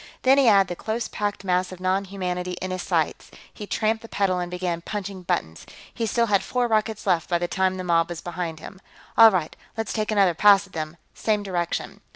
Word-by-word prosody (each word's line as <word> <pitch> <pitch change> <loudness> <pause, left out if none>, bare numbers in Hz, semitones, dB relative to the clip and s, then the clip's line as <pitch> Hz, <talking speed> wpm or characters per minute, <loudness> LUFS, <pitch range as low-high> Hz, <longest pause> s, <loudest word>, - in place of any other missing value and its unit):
Then 270 +2 +5
he 270 - +4
had 200 -3 +6
the 175 - -4
close 220 +5 -3
packed 205 -1 -3
mass 185 -1 0
of 185 - -9
non 185 +2 0
humanity 180 -2 -3
in 185 +1 -5
his 185 0 -3
sights; - - -1 0.2
he 210 - -8
tramped 220 +1 0
the 230 - -12
pedal 190 -3 0
and 175 0 -3
began 180 -1 -3
punching 200 0 -5
buttons. 80 - -2 0.3
He 230 -2 -2
still 235 +2 +2
had 200 -3 +2
four 245 +4 -1
rockets 220 -1 0
left 175 -4 +1
by 175 - +2
the 175 0 -2
time 185 +1 0
the 185 - -4
mob 170 -1 +2
was 170 -2 -5
behind 175 -2 -5
him. 190 +3 -11 0.3
"All 225 0 +9
right, 180 -6 -2 0.2
let's 225 -2 -2
take 215 -1 -2
another 200 -4 +3
pass 200 +3 +5
at 190 - -21
them. 155 0 -5 0.2
Same 210 -2 0
direction." 175 -3 -3
190 Hz, 220 wpm, -24 LUFS, 180-210 Hz, 0.3 s, All